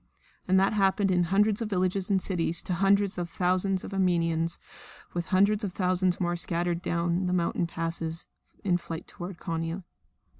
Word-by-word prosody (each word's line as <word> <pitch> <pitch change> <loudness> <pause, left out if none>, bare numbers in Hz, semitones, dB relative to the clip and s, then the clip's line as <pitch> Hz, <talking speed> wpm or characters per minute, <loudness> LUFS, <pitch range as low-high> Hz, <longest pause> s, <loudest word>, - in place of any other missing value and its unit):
And 190 +1 +4
that 195 +2 +3
happened 195 -1 +2
in 180 -1 +3
hundreds 205 +4 +2
of 225 - -2
villages 185 0 0
and 195 -1 +3
cities 170 -3 +1
to 180 - -2
hundred 195 +1 +2
of 175 -1 -3
thousands 185 +2 +1
of - - -7
Armenians, 170 -3 +1 0.5
while 175 - -1
hundreds 200 +4 +2
of 195 -3 -3
thousands 185 -1 +1
more 175 -1 0
scattered 175 0 -1
down 175 +1 0
the 180 - 0
mountain 170 -1 0
passes 165 0 -3 0.4
in 180 -3 +2
flight 165 -1 -7
towards 180 -1 -8
Konia. 165 +3 -3
180 Hz, 165 wpm, -28 LUFS, 170-195 Hz, 0.5 s, And